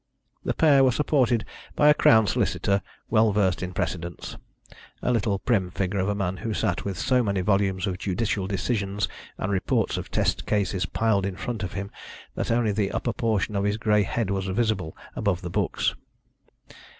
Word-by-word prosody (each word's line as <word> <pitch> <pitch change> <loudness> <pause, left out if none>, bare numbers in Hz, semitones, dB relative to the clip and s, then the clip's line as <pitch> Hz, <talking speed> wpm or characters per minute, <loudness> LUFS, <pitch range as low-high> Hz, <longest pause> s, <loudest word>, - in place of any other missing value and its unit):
The - - -1
pair 145 -4 +5
were 130 - +5
supported 130 -4 +2 0.3
by 150 - +4
a 150 - +8
Crown 110 -6 +5
Solicitor 100 +1 +1 0.3
well 110 -1 +4
versed 95 -4 +1
in 90 -1 -3
precedents 85 -1 -4 0.7
a - - +2
little 110 -4 +1
prim 100 -4 0
figure 95 +2 -2
of 95 +2 0
a 105 - 0
man 95 -2 -2
who 110 +1 -3
sat 90 - -1
with 100 -2 -4
so 130 -1 +2
many 100 -4 0
volumes 95 -1 +1
of 95 -2 -3
judicial 100 0 -1
decisions 100 0 -1 0.3
and 95 - -2
reports 95 -2 0
of - - -5
test - - 0
cases 95 -3 0
piled 110 -1 +1
in 95 - -4
front 105 +3 -4
of 95 - -4
him 100 0 -5 0.4
that - - -3
only 115 -2 +2
the 100 -1 0
upper 120 - -2
portion 110 -3 0
of 100 - +1
his 105 +1 0
grey 105 -1 +3
head 100 0 -1
was 95 -1 -1
visible 95 -5 -1 0.2
above 100 -4 -1
the 90 - -5
books. - - 0
100 Hz, 185 wpm, -25 LUFS, 95-110 Hz, 0.7 s, a